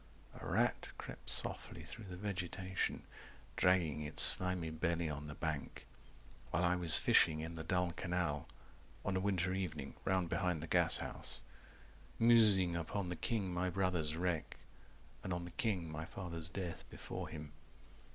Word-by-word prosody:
A - - -11
rat - - +1
crept - - -8
softly - - -2
through 115 - -9
the 90 -2 -8
vegetation 95 -1 -3 0.5
Dragging 85 -5 +2
its 75 0 +5
slimy 90 -3 +6
belly 85 0 -1
on 75 0 -6
the 75 - -7
bank 80 -4 -4 0.6
While 90 - 0
I 90 0 +3
was 85 -3 +6
fishing 80 -2 +4
in 80 +1 -5
the 80 -1 -5
dull 90 +2 0
canal 85 -4 -2 0.6
On 100 - 0
a - - +2
winter 95 -2 0
evening 80 -7 -4
round 95 -2 +1
behind 90 -2 -1
the - - -5
gashouse - - +1 0.8
190 115 - +1
Musing 105 -7 +5
upon 90 +3 -3
the 90 - -3
king 95 +1 -2
my 90 +1 0
brother's 90 -4 0
wreck 85 -3 -2 0.7
And 95 - -4
on 85 -1 -2
the 90 - -9
king 90 -8 -2
my 80 +1 -5
father's 85 -2 -5
death 90 -1 -5
before - - -6
him. 75 -1 -8
90 Hz, 155 wpm, -36 LUFS, 80-95 Hz, 0.8 s, slimy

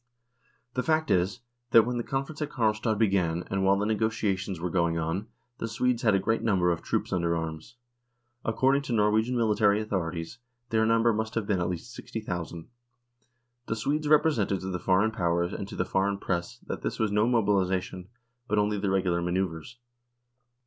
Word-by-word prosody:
The 125 - 0
fact 160 +2 +1
is, 95 +6 +1 0.3
that 115 -1 +7
when 125 +1 -2
the 120 - -1
conference 135 +5 -4
at 150 - -1
Karlstad 110 -3 0
began, 90 -6 +1
and 95 0 0
while 95 +1 +4
the 100 - 0
negotia 110 -1 +1
tions 95 -2 -5
were 90 0 -3
going 85 -2 +1
on, 85 +6 -2 0.3
the 115 - -2
Swedes 120 +2 0
had 110 -4 +3
a - - +3
great 110 +4 0
number 95 -5 +2
of 85 - -2
troops - - -2
under 85 -2 +1
arms. 80 +7 -6 0.7
According 130 +5 +2
to 130 -4 -4
Norwegian 110 +3 +2
military 105 -2 +3
authorities 90 -2 -3 0.3
their 110 -1 +3
number 115 0 +3
must 110 +1 -3
have 115 -3 0
been 100 -3 0
at 90 - 0
least 90 +7 -6
60,000. 90 -9 -6 1.0
The 115 - -1
Swedes 145 +7 -1
represented 145 - +3
to 95 0 -4
the 90 - -3
Foreign 95 +5 +2
Powers 85 -3 0
and 100 - -5
to - - -8
the - - 0
Foreign 100 +1 0
Press 85 -3 -3
that - - -5
this - - -3
was 110 -2 0
no 105 +2 +3
mobilisation, 95 -5 0 0.4
but 105 - 0
only 105 0 +1
the 100 0 -1
regular 90 -3 +1
manoeuvres. 90 +4 -2
105 Hz, 185 wpm, -28 LUFS, 90-115 Hz, 1.0 s, that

